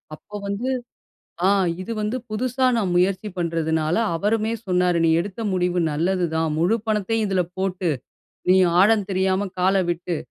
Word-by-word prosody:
அப்போ 210 +6 -13
வந்து, 205 +6 -2 0.8
ஆ - - +5 0.3
இது 185 - -6
வந்து 210 +4 -1
புதுசா 255 +4 0
நான் 195 -6 0
முயற்சி 185 +3 +1
பண்றதுனால 160 -2 0 0.2
அவருமே 215 +5 0 0.2
சொன்னாரு 180 -1 +2
நீ - - +3
எடுத்த 200 +4 -7
முடிவு 180 -1 +1
நல்லதுதான். 165 0 0
முழு 180 +7 +3
பணத்தையும் 215 +1 0
இதில 190 -2 +1 0.2
போட்டு 185 -2 -1 0.6
நீ 185 - +6 0.2
ஆழம் 210 0 +4
தெரியாம 190 +1 +1
கால 190 +2 +3
விட்டு 175 0 -2
185 Hz, 140 wpm, -23 LUFS, 175-210 Hz, 0.8 s, நீ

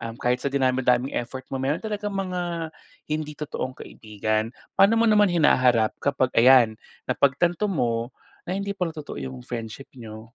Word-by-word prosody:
um, 115 -1 -6
kahit 125 +1 0
sa - - -1
dinami-daming 130 -1 +1
effort 125 +2 -4
mo, 135 - -2
meron 135 +3 0
talagang 210 -1 -3
mga 175 -4 -3 0.3
hindi 150 -1 -4
totoong 130 -3 -5
kaibigan. 110 0 -3 0.2
Paano 200 +4 +4
mo 230 - +3
naman 210 -3 +5
hinaharap 125 -9 +3
kapag 130 -3 0
ayan, 120 -1 +6 0.3
napagtanto 175 +9 +1
mo 120 -9 -1 0.4
na 185 - -1
hindi 200 0 -3
pala 175 -5 -3
totoo 145 - -7
'yung 65 -2 -7
friendship 115 +3 -7
niyo? 110 -3 -10
135 Hz, 155 wpm, -24 LUFS, 120-175 Hz, 0.4 s, ayan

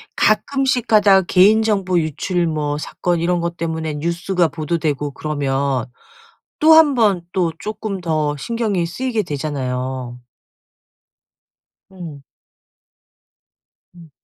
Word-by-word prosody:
가끔씩 270 -3 +1
가다 205 -3 +5
개인정보 195 -1 +3
유출 170 +3 -1
뭐 150 -2 -2
사건 175 +3 -2
이런 175 +1 0
것 170 0 -3
때문에 160 -2 -3
뉴스가 170 +3 0
보도되고 150 -3 -2
그러면 140 -3 -2 0.7
또 315 +1 +6
한번 240 - +4
또 175 -3 0
쪼끔 215 -2 -5
더 155 -3 -1
신경이 210 -1 -2
쓰이게 230 +5 -2
되잖아요. 130 -5 -4 1.7
음. 165 -7 -9 1.7
음. 170 -3 -15
170 Hz, 205 characters per minute, -19 LUFS, 150-200 Hz, 1.7 s, 또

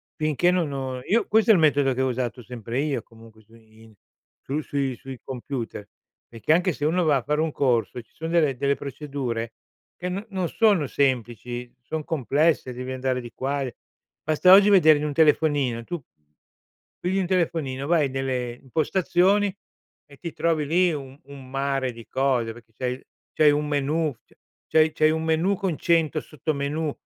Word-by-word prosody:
finché 155 +3 +2
non 175 -5 0
ho 130 -2 -4
io 230 +3 +1
questo 220 +1 +3
è - - +9
il - - +3
metodo 145 -3 +3
che 130 - -2
ho - - +1
usato 125 -1 -3
sempre 120 +1 -5
io 145 -1 -1
comunque 115 -1 -17
su 110 +2 -22
in 110 0 -19 0.5
sui 145 +3 -2
sui 140 -3 -2
sui 130 0 -10
computer. 125 -5 -5 0.4
Perché 115 +5 -2
anche 175 +1 +3
se - - -7
uno 165 +3 +2
va 145 -3 +4
a - - -2
fare 150 +1 0
un 160 0 0
corso 125 -4 +1
e 120 - -5
ci - - -37
son 160 0 -6
delle 150 -6 +2
delle 140 +2 +1
procedure 135 -5 -4 0.4
che 180 - -4
no 195 +4 -4
non 185 -4 -2
sono 205 -9 +3
semplici, 120 -2 -2
son 155 +5 -4
complesse, 150 -2 +1
devi 125 +1 -6
andare 130 0 -1
di 120 -1 -10
qua 140 +2 -2
e 125 - -6 0.5
basta 155 +4 +4
oggi 200 +1 +8
vedere 160 -6 +6
in 150 - -2
un 145 - -2
telefonino, 145 -6 +2
tu 175 -3 -5 1.0
pigli 190 +2 +1
un 180 - -1
telefonino 160 -7 -1
vai 160 -4 +3
nelle 130 -2 -2
impostazioni 185 - +1 0.5
e 140 - -15
ti 170 +2 -7
trovi 160 -3 0
lì 175 +4 +3
un 135 -1 -7
un 140 -2 -12
mare 135 -1 -1
di 115 -1 -12
cose, 130 -4 0
perché 115 -1 -17
c'hai 125 -1 -2
il 130 - -12 0.3
c'hai 155 -1 +5
un 150 +1 0
menù, 150 +2 0
c - - -25 0.3
c'hai 160 0 +4
c'hai 155 0 +3
un 160 0 -1
menù 160 +5 +1
con 185 -5 -2
100 165 -3 +2
sottomenù, 150 0 -3
145 Hz, 185 wpm, -24 LUFS, 130-160 Hz, 1.0 s, è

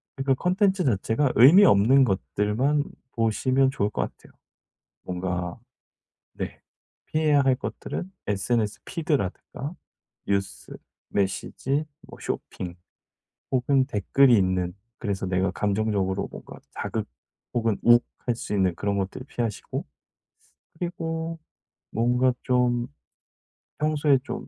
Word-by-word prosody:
그러니까 135 0 +1
컨텐츠 190 +4 +2
자체가 120 +3 +1
의미 155 - +9
없는 130 - +6
것들만 105 - +1 0.3
보시면 130 +4 +2
좋을 105 -6 0
것 - - -1
같아요. - - -10 0.7
뭔가 90 -1 -3 0.7
네. - - -6 0.5
피해야 155 -2 +3
할 135 -1 +4
것들은 175 +6 -5 0.2
SNS 105 +1 0
피드라든가 145 - -3 0.5
뉴스, 95 -11 -2 0.4
메시지, 100 +9 -1 0.2
뭐 - - -13
쇼핑 90 -2 -5 0.8
혹은 130 +1 +3
댓글이 130 +2 +4
있는 90 -2 0 0.2
그래서 100 -4 -2
내가 95 0 +1
감정적으로 100 -1 0
뭔가 - - -10
자극 - - -3 0.5
혹은 115 -3 +1
욱할 120 0 +3
수 110 - -5
있는 95 -4 +2
그런 100 +2 -1
것들을 100 +7 -3
피하시고 115 -6 -3 0.9
그리고 165 -1 -3 0.5
뭔가 125 +3 +2
좀 125 -1 +2 0.9
평소에 150 -2 +3
좀 - - -6
120 Hz, 245 characters per minute, -25 LUFS, 100-140 Hz, 0.9 s, 의미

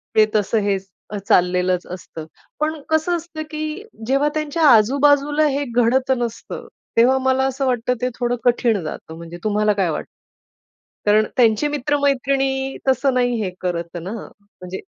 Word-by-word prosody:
ते 215 - +7
तसं 215 +2 +2
हेच 195 -1 -1 0.3
अ - - -2
चाललेलंच 180 0 +2
असतं. 165 -3 -8 0.3
पण 310 0 -1
कसं 315 +3 +2
असतं 325 -1 -8
की 310 +5 -4 0.2
जेव्हा 275 +3 +2
त्यांच्या 310 +1 -1
आजूबाजूला 285 +6 +4
हे 280 0 0
घडत 250 +2 +2
नसतं, 235 -1 -5 0.3
तेव्हा 255 +3 +5
मला 265 0 +3
असं 270 +1 -1
वाटतं 250 -1 +1
ते 250 - +1
थोडं 245 0 +1
कठीण 235 -4 +2
जातं. 160 +1 -7
म्हणजे 170 +1 -9
तुम्हाला 210 0 +2
काय 195 -3 0
वाटतं? 155 - -4 0.9
कारण 215 +1 +4
त्यांची 230 +3 +4
मित्र-मैत्रिणी 275 -1 0
तसं 265 +1 +2
नाही 245 -1 +1
हे 185 - -1
करत 170 -1 -3
ना? 185 +5 -6 0.3
म्हणजे 190 -2 -9
245 Hz, 150 wpm, -21 LUFS, 205-280 Hz, 0.9 s, ते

